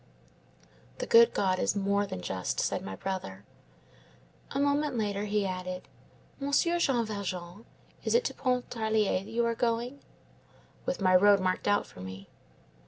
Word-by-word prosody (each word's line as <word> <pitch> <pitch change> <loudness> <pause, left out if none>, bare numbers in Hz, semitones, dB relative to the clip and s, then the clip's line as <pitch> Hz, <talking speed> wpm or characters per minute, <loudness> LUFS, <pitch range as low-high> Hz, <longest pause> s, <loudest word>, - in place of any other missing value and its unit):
"'The - - -3
good 465 -1 +7
God 185 -2 +1
is - - +1
more 200 0 +1
than 90 - -5
just,' 90 0 -3
said - - 0
my 95 - -6
brother. 100 - -5 1.1
"A 275 - -3
moment 285 -1 +1
later 205 -2 -1
he 205 -1 0
added:— 185 -1 -4 0.5
"'Monsieur 290 +5 +2
Jean 250 -8 +2
Valjean, 190 -1 -5 0.4
is - - +1
it 485 - +4
to - - -2
Pontarlier 220 -6 0
that 205 - -11
you 235 +1 +1
are 235 - +1
going?' 240 +3 -1 0.9
"'With 265 - -1
my 185 -1 +4
road 200 +2 +6
marked 185 +1 -1
out 205 0 +3
for - - -15
me. 95 +1 -8
205 Hz, 155 wpm, -29 LUFS, 185-245 Hz, 1.1 s, good